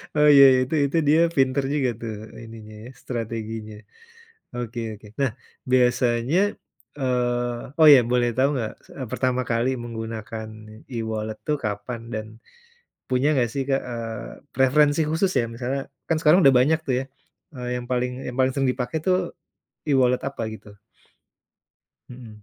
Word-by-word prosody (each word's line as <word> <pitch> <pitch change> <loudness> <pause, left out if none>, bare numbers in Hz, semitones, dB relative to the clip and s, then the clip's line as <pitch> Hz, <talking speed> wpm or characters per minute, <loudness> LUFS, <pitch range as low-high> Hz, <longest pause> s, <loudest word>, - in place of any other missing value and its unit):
Oh, 150 0 +5
ya, 140 -1 +9
ya, 130 - +3
itu 160 - -2
itu 140 +4 -1
dia 155 - +5 0.2
pinter 135 0 +2
juga 135 -4 +1
tuh, 115 -2 -4 0.2
eee, 115 - -10
ininya 110 -1 -11
ya, 125 - -9
strateginya. 110 -2 -5 0.8
Oke 120 -1 -5
oke. 105 0 -13
Nah, 135 -4 +2 0.4
biasanya 125 +3 +2 0.6
eee, 120 -1 -1
oh 155 - +9
ya - - +7
boleh 120 -1 +2
tahu 135 - +4
enggak? 115 -5 -3
S - - -23
eee, 130 -4 -6
pertama 130 -1 0
kali 115 +2 +1
menggunakan 110 -1 -6 0.4
e-wallet 110 -3 -4
tuh 150 -1 +1
kapan 105 +3 -4
dan 110 0 -3 0.8
punya 130 +2 +1
enggak 125 -5 +1
sih, 135 - 0
Kak, 135 0 +2
eee, 115 -2 -5 0.3
preferensi 145 +3 +4
khusus, 175 +5 +1
ya 115 - +1
misalnya 130 +3 -3 0.3
kan 165 - +1
sekarang 160 +3 +5
udah 135 - +8
banyak 155 +5 +3
tuh 130 - +1
ya, - - -3 0.5
eee, 125 -1 -5
yang 120 - -8
paling 125 0 0 0.2
yang 125 - -5
paling 130 0 +3
sering 135 0 0
dipakai 125 +4 -3
tuh 185 -1 +4 0.7
e-wallet 125 -3 +3
apa 140 - -8
gitu? 110 - -12 1.4
Mhm. 115 -4 -12
125 Hz, 160 wpm, -24 LUFS, 115-135 Hz, 1.4 s, ya